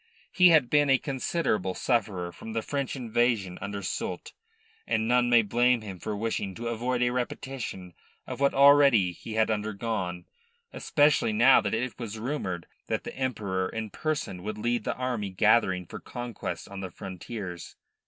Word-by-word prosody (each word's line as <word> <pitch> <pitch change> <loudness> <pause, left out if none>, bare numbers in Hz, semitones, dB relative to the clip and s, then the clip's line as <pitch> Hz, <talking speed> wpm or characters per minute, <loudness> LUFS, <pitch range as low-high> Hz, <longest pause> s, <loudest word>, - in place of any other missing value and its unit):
He 180 -1 +6
had 155 -7 +5
been 145 +1 +3
a 135 - +6
considerable 130 - -1
sufferer 100 -7 -1
from 110 +5 -9
the 115 -1 -1
French 140 -2 -3
invasion 115 -6 0
under 100 0 -5
Soult, - - -4 0.5
and 110 0 0
none 120 0 +3
may 120 -1 +6
blame 120 +3 +2
him 95 -4 -8
for 105 +4 -4
wishing 100 -3 -2
to 120 0 -4
avoid 120 +2 -1
a 120 - +2
repetition 120 -7 -4 0.3
of - - -6
what 140 0 +2
already 140 -8 +6
he 110 +5 -9
had 110 0 +2
undergone, 105 -4 -3 0.5
especially 145 -6 +2
now 120 +5 +6
that - - -1
it 120 +1 -3
was 115 -2 -5
rumoured 110 - -3 0.2
that - - -2
the - - -7
Emperor 105 -8 -2
in 110 -2 -5
person 150 - -3
would 105 +2 -5
lead 120 +2 -1
the - - -1
army 125 -5 -2
gathering 95 -2 +3
for - - -8
conquest 120 -2 -6
on 100 0 -8
the 95 -1 -5
frontiers. 95 0 -7
115 Hz, 165 wpm, -28 LUFS, 100-125 Hz, 0.5 s, He